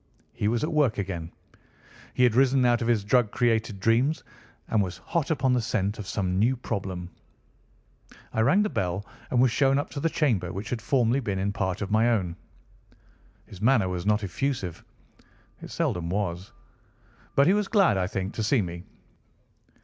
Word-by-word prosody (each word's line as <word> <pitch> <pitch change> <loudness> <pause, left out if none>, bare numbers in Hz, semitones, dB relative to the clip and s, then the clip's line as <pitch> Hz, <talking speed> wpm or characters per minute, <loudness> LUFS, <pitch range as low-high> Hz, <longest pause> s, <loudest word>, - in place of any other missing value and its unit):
He 105 - -1
was 115 +4 0
at 160 +2 -1
work 145 -7 +2
again. 90 -4 -4 0.8
He 125 - +3
had 120 -3 +4
risen 130 +1 +4
out 120 -1 +3
of 115 - -1
his 115 -4 +2
drug 115 +1 +3
created 115 -3 0
dreams 120 +9 +2 0.5
and 110 - +2
was 90 -3 -3
hot 160 - -2
upon 135 -5 +1
the 125 - +2
scent 105 -1 -1
of 100 - -6
some 95 -2 -1
new 120 +5 +3
problem. 95 -6 -4 1.3
I 110 - +1
rang 145 - +4
the 210 - -1
bell 95 - -2 0.2
and 125 - +1
was 125 -1 +4
shown 135 +2 +3
up 145 - -3
to 140 - -5
the 165 - +1
chamber 120 - 0
which 95 +5 -6
had 120 -3 -2
formerly 125 +1 +2
been 100 -7 -3
in 100 +2 -1
part 100 -1 -2
my 110 +2 +3
own. 95 -7 0 1.1
His 95 - -13
manner 115 -4 +3
was 90 -1 -3
not 105 0 +2
effusive. 100 - -3 0.8
It - - -9
seldom 85 -1 -2
was; 95 +1 -3 0.8
but 140 - +5
he 180 - +5
was 205 -1 +1
glad, 195 - +4
I 90 - 0
think, 95 -1 -4
to 110 - -3
see 110 +1 +2
me. 85 -1 -6
110 Hz, 180 wpm, -26 LUFS, 95-130 Hz, 1.3 s, but